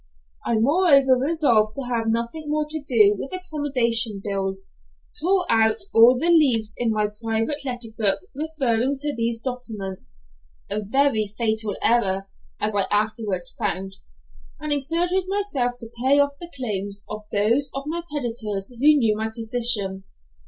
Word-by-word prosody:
I 235 - +1
moreover 275 +1 +4
resolved 255 -8 +2
to 275 - -4
having 230 -2 -1
nothing 235 +7 -3
more 305 0 0
to 310 0 -5
do 220 -7 +4
with 270 - -6
accommodation 255 - 0
bills, 195 -1 -3 0.5
tore 365 +2 +2
out 220 -1 +3 0.2
all 235 +3 +7
the 335 +6 +2
leaves 240 -10 +3
in 240 - -1
my 215 -1 +1
private 225 +6 -2
letter 245 -3 -4
book 205 -4 +2
referring 275 -4 0
to 295 +1 -2
these 230 0 -1
documents 215 - -6 0.5
a 215 - -1
very 230 -1 +2
fatal 220 -2 -1
error, 195 -5 +2 0.3
as 210 0 -1
I 195 -1 +1
afterwards 210 -3 -1
found 195 -2 -3 0.6
and 300 - -1
exerted 340 +6 +1
myself 375 -12 -1
to 230 -2 -8
pay 270 +3 +4
off 285 0 +3
the 345 0 -10
claims 200 -5 -4
of 215 0 -7
those 230 +7 +2
of 275 - -3
my 330 +3 -3
creditors 225 -8 -2
who 245 - -15
knew 255 -8 +5
my 220 +1 -2
position. 220 -4 0
235 Hz, 150 wpm, -23 LUFS, 215-285 Hz, 0.6 s, all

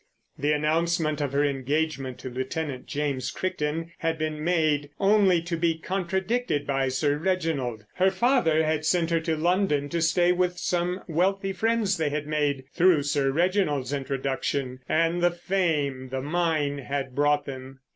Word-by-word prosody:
The 145 +2 0
announcement 155 0 +1
of 140 -2 -1
her 140 +1 +2
engagement 140 -1 -1
to 130 - -5
Lieutenant 130 +2 -4
James 140 -3 -2
Crichton 165 -2 -3
had 165 -1 -1
been 155 -1 -3
made, 155 -4 +1
only 195 -4 +4
to 170 0 -2
be 165 -1 +1
contradicted 190 0 -1
by 135 -1 0
Sir 145 +3 +1
Reginald. 155 - -1
Her 185 +1 +3
father 190 - +2
had 155 -1 0
sent 170 +1 +1
her 165 - +3
to 160 -1 -1
London 165 -4 +1
to 170 +2 -1
stay 175 +2 +3
with 180 0 0
some 180 +1 -1
wealthy 195 +4 0
friends 220 -1 +1
they 160 -2 0
had 145 0 -3
made—through 150 +2 +2
Sir 145 -1 +1
Reginald's 150 -4 +1
introduction 135 -1 -2
and 165 +2 +2
the 175 - +5
fame 160 -7 -1
the 130 0 -3
mine 155 -3 0
had 135 -1 -4
brought 145 +2 +2
them. 130 -1 -8
155 Hz, 155 wpm, -26 LUFS, 140-175 Hz, -, the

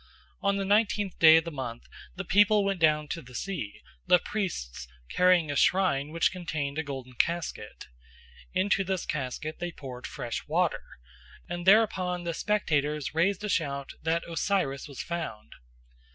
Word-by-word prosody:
On 200 0 +1
the 195 - -1
nineteenth 205 -1 +1
day 160 -1 +9
of 165 - +2
the 170 - -6
month 125 -5 -6 0.3
the 195 +1 -5
people 205 +2 +4
went 195 -2 -1
down 150 -2 +3
to 165 - -4
the 125 0 -14
sea, 160 - -5 0.3
the 180 - +7
priests 175 - -4 0.2
carrying 180 -4 +4
a - - -3
shrine 160 -5 +2
which 165 +2 +1
contained 155 -5 -3
a - - -1
golden 135 -3 -7
casket. 170 +7 -2 0.7
Into 195 +1 +2
this 190 -1 -2
casket 150 +2 -4
they 175 0 -3
poured 130 -5 -8
fresh 120 -5 -5
water, - - +1 0.7
and 175 +1 -5
thereupon 185 -4 +4
the 170 -1 -2
spectators 150 -8 0
raised 190 +5 +1
a - - -1
shout 140 -6 -1
that 165 +1 -1
Osiris 165 -5 -1
was 140 -4 -7
found. 170 -11 -5
170 Hz, 155 wpm, -28 LUFS, 140-190 Hz, 0.7 s, day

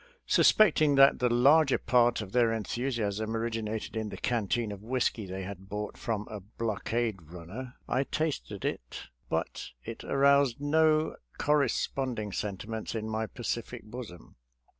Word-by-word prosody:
Suspect 215 -6 +5
ing 145 -2 +4
that 135 0 +6
the 125 - +2
larger 135 +4 +5
part 120 -1 +3
of 95 -3 -7
their 120 -1 +3
enthusiasm 110 -1 -2
originated 110 -1 -3
in 110 -1 -2
the - - -7
canteen 115 -1 0
of 100 -1 -8
whisky 115 -2 -1
they 95 0 -5
bought 105 +2 -5
from 110 -2 -3
a 105 - -6
blockade 110 +1 -2
runner, 90 - -9
I 135 - +1
tasted 150 - -3
it, - - -4 0.3
but - - -2 0.2
it 115 - -7
aroused 140 -2 +3
no 155 +1 +2 0.2
corresponding 130 -5 0
sentiments 110 +4 -4
in 110 -1 -3
my 110 0 -2
pa 120 - -10
cific 115 +1 -3
bosom. 105 - -10
115 Hz, 140 wpm, -29 LUFS, 105-130 Hz, 0.3 s, that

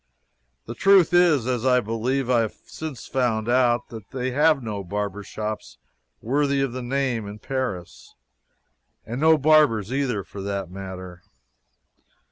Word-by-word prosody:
The 115 - -6
truth 190 +3 +4
is, 170 -8 +4
as 125 -2 -1
I 125 -1 +4
believe 120 +4 -1
I 125 -2 +3
have 110 -2 -1
since 155 -5 -7
found 120 -4 0
out, 120 -1 +2
that 110 -3 -10
they 130 -1 -3
have 150 +1 +3
no 105 -3 -4
barber 105 +2 -3
shops 105 +2 -6 0.5
worthy 140 +3 +1
of 135 -3 -1
the 130 - -4
name 125 -3 -1
in 100 +1 -8
Paris 115 -7 -5 0.9
and 120 +5 -5
no 160 0 +6
barbers, 140 -8 +3
either, 130 -7 -1
for 100 - -9
that 100 -2 -4
matter. 95 -2 -8
120 Hz, 145 wpm, -24 LUFS, 105-135 Hz, 0.9 s, no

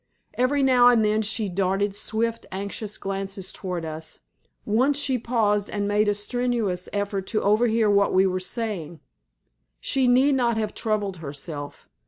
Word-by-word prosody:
Every 270 +3 +1
now 250 -2 +6
and 235 -3 +5
then 215 +1 +2
she 215 0 -1
darted 195 +2 0
swift, 225 +2 -1
anxious 200 +2 -5
glances 195 -1 -4
towards 180 -3 -4
us, 155 0 -7 0.4
once 255 +7 +2
she 265 -3 +1
paused 210 -4 0
and 205 -1 -2
made 210 +1 +2
a 205 - +1
strenuous 215 -4 -1
effort 200 -1 -2
to 215 - -1
overhear 220 +1 +3
what 200 -1 +3
we 190 +1 +4
were 185 -1 0
saying. 185 -6 -4 0.8
She 265 -1 +1
need 260 +3 +4
not 240 -3 +1
have 215 -1 -2
troubled 210 -4 -2
herself. 145 -1 -7
210 Hz, 155 wpm, -24 LUFS, 195-230 Hz, 0.8 s, now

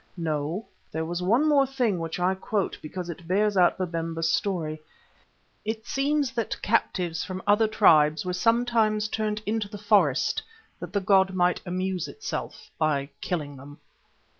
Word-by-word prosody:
No, 160 +4 -2 0.3
there 160 +1 -2
was 175 +2 -3
one 230 +12 +3
more 280 -3 +4
thing 245 -8 0
which 165 +1 -4
I 180 +1 +2
quote 190 +1 -2
because 175 +3 -6
it 170 0 -8
bears 205 +3 +2
out 180 -2 +4
Babemba's 165 -2 -2
story. 160 -6 -1 0.8
It 220 +1 -4
seems 280 0 0
that 230 -4 -3
captives 180 -6 0
from 185 -1 -6
other 210 +2 +4
tribes 160 -7 +4
were 180 - -2
sometimes 220 +1 +2
turned 215 0 -2
into 215 -1 -1
the 205 - -7
forest 200 - +2 0.4
that - - -7
the 200 - 0
god 190 0 +3
might 180 0 +2
amuse 185 -1 -2
itself 435 - -6
by 145 -3 +1
killing 145 -5 -3
them. 145 +2 -12
185 Hz, 155 wpm, -26 LUFS, 165-215 Hz, 0.8 s, more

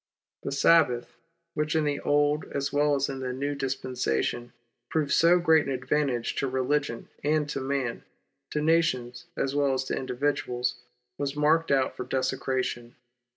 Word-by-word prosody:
The - - -4
Sabbath 140 -4 +3 0.4
.which 150 0 -1
in 160 - +3
the 145 -1 0
Old 145 +1 +2
as 140 0 -2
well 145 0 +3
as 140 0 0
in 135 -1 -5
the 130 -1 -3
New 140 +3 -2
Dispensation, 130 - -2 0.4
proved 155 -3 0
so 170 +2 +5
great 160 -3 +4
an - - -1
advantage 130 -1 0
to 135 - 0
religion 130 -1 -1
and 150 0 +1
to 140 - -2
man 130 -3 -2 0.2
— - - -53
to 150 - -2
nations 125 -7 +1
as 135 - -1
well 140 -2 +2
as 130 - -1
to - - -3
individuals 125 -1 -1 0.2
— 125 0 -51
was 140 0 -2
marked 155 +2 +2
out 135 -2 +2
for - - -4
desecration. 130 -2 -2
140 Hz, 165 wpm, -27 LUFS, 125-150 Hz, 0.4 s, so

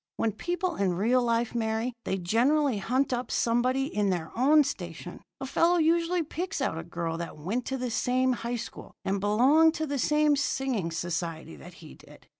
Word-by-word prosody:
When 225 - +1
people 350 - -3
in 190 -3 +1
real 235 +7 +2
life 235 -1 0
marry, 225 +1 -1
they 190 - -1
generally 240 - +2
hunt 255 +6 0
up 245 -1 -3
somebody 250 +3 +1
in 210 -6 -1
their 170 -4 -2
own 295 +5 +5
station. 175 - -6 0.2
A - - -4
fellow 335 +6 +2
usually 335 +2 +2
picks 355 +4 -4
out 165 - -1
a - - -6
girl 170 -1 -4
that 170 - -6
went 200 +11 -3
to 265 - -2
the 250 -2 -3
same 255 +2 +1
high 235 0 -3
school 235 - -8
and 195 +1 0
belonged 265 +11 +4
to 315 - -2
the 285 -2 -3
same 300 +3 +3
singing 265 -9 -1
society 165 - -4
that 70 - -13
he - - -11
did. - - -17
240 Hz, 190 wpm, -28 LUFS, 195-285 Hz, 0.2 s, own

